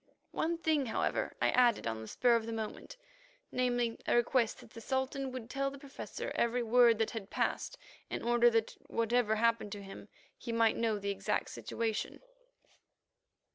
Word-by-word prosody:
One 335 +1 -1
thing, 310 -5 +1
however, 220 - -1
I - - +3
added 245 -3 +4
on 110 -1 -2
the 110 - -8
spur 240 - +3
of 230 -1 -1
the - - -3
moment—namely, 255 - -4
a - - +3
request 240 -1 +2
that - - -16
the 230 - -10
Sultan 265 +2 -2
would 255 -3 -6
tell 275 +2 -1
the 280 - -10
Professor 275 0 -7
every 240 +1 +1
word 235 0 +5
that 225 0 0
had 220 -4 -6
passed, - - -1 0.3
in - - -4
order 240 0 +5
that 225 -1 0
whatever 230 -1 +1
happened 230 -1 +1
to 205 -1 -7
him 195 +1 -10 0.3
he 235 - -6
might 230 -1 +3
know 225 -2 0
the 200 0 -2
exact 195 -1 -1
situation. 225 -2 -3
235 Hz, 170 wpm, -33 LUFS, 225-260 Hz, 0.3 s, word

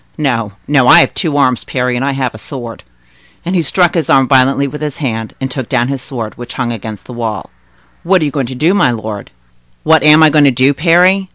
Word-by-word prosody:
No, 120 -9 -2
no; 135 -4 +2
I - - +8
have 135 - 0
two 155 -5 -2
arms, 130 -4 +1
Parry, 125 -1 -2
and 120 - -2
I 140 0 -1
have 130 -3 -3
a 110 - -11
sword." 120 -3 -8 0.6
And 180 - -2
he 175 - +2
struck 175 +3 +1
his 165 -3 -2
arm 135 -1 +4
violently 135 +1 +2
with 150 +2 -8
his 150 0 -4
hand, 115 -7 -4
and 130 -1 -4
took 130 -3 -5
down 125 -1 0
his 135 -2 -3
sword, 120 -5 -6
which 120 0 -8
hung 120 -2 -2
against 110 -3 -8
the 125 - -10
wall. 110 -6 -5 0.5
"What 185 -1 +1
are - - +1
you 145 - -2
going 135 -4 -2
to 130 - -7
do, 160 +8 +1
my 200 - +2
lord?" 110 -3 -6 0.5
"What 160 -1 +3
am 150 +1 +6
I 155 - +5
going 150 -1 +4
to - - +6
do, 130 +2 +2
Parry? 180 +5 +2
135 Hz, 245 wpm, -13 LUFS, 120-150 Hz, 0.6 s, I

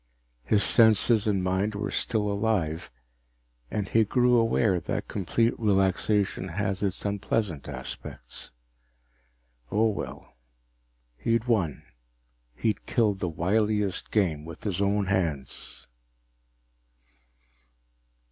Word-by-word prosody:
His 100 - +2
senses 110 +1 +4
and 100 -3 +1
mind 95 +3 0
were 100 0 -3
still 110 -4 0
alive, 100 -6 -1 0.8
and 105 -2 -2
he 110 +3 +3
grew 125 +3 +3
aware 115 -4 +2
that - - -4
complete 115 +4 0
relaxation 100 -1 +1
has 95 +2 -2
its 100 -1 -2
unpleasant 100 -5 -1
aspects. - - -8 1.2
Oh, 110 +2 +3
well 105 - -7 0.8
he'd 115 - 0
won. 100 - 0 0.7
He'd 110 - -2
killed 105 -5 +1
the 90 - -1
wiliest 105 +3 0
game 85 -8 +1
with 80 0 -10
his 100 -3 -2
own 100 0 +1
hands. 85 -8 -3
100 Hz, 100 wpm, -27 LUFS, 95-110 Hz, 1.2 s, senses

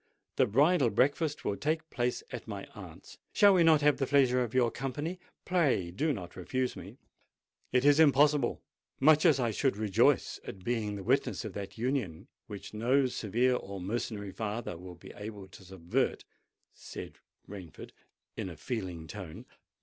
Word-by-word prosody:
The - - +4
bridal 140 - +3
breakfast 145 +7 0
will 100 - 0
take 155 +1 -1
place 120 0 -1
at - - -7
my - - -6
aunt's: - - -12
shall 205 -2 +6
we 180 - +4
not 160 -2 +5
have 145 0 +4
the 135 - -1
pleasure 130 -3 +3
of 120 - -5
your 120 -2 +3
company? 145 +9 -4 0.3
Pray, 140 - +1
do 150 - 0
not 95 -10 -6
refuse 125 +8 -2
me." - - -10 0.7
"It 125 +2 +2
is 145 +1 +6
impossible—much 150 +1 +3
as 145 -5 +4
I 120 -3 +1
should 130 +1 0
rejoice 105 -3 +2
at 95 -2 -9
being 110 -2 -1
the 100 - -6
witness 130 +1 0
of 105 - -6
that 100 +1 -7
union 115 - -2 0.2
which 100 0 -9
no 125 +6 +2
severe 125 +1 +1
or 100 -5 -6
mercenary 105 +1 -4
father 110 -1 -4
will 90 +1 -10
be 85 - -13
able 105 -2 -8
to 95 +1 -14
subvert," 90 -2 -2 0.5
said - - -9 0.3
Rainford 95 -6 -10 0.4
in - - -4
a 85 - -10
feeling 90 - -5
tone. 90 -2 -9
120 Hz, 165 wpm, -30 LUFS, 100-140 Hz, 0.7 s, shall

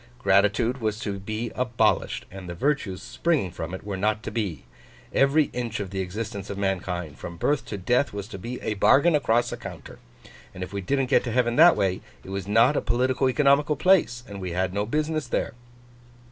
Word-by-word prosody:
Gratitude 115 +4 +2
was 110 -1 -1
to 100 -3 -4
be 110 +4 -4
abolished, 125 -2 0
and 95 -2 -9
the 85 - -5
virtues 100 - -1
springing 155 - 0
from 80 0 -6
it 95 - -7
were 100 -2 -4
not 105 +3 0
to - - -5
be. 105 - -3 0.5
Every 140 +2 +3
inch 120 -2 -3
of 100 -2 -5
the 95 - -3
existence 100 +2 -5
of 100 - -5
mankind, 90 -5 -3
from 85 0 -7
birth 145 - 0
to 105 - -5
death, 125 +9 +1
was 100 -1 -6
to 95 - -8
be 120 +6 -6
a 110 - -1
bargain 135 - +4
across 120 -5 +2
a - - -4
counter. - - -10 0.6
And 90 - -5
if 90 +1 -8
we 100 - -3
didn't 135 +7 0
get 130 - +3
to 120 - -2
Heaven 120 0 +1
that 170 +3 +8
way, 95 -3 0 0.2
it 95 - -9
was 100 0 -4
not 115 +8 +4
a - - +1
politico 130 +3 +1
economical 145 +2 +3
place, 160 -11 +3
and 100 -1 -8
we 90 -2 -4
had 95 +1 -1
no 100 +1 -1
business 155 +2 -1
there. - - -1
110 Hz, 205 wpm, -25 LUFS, 95-130 Hz, 0.6 s, that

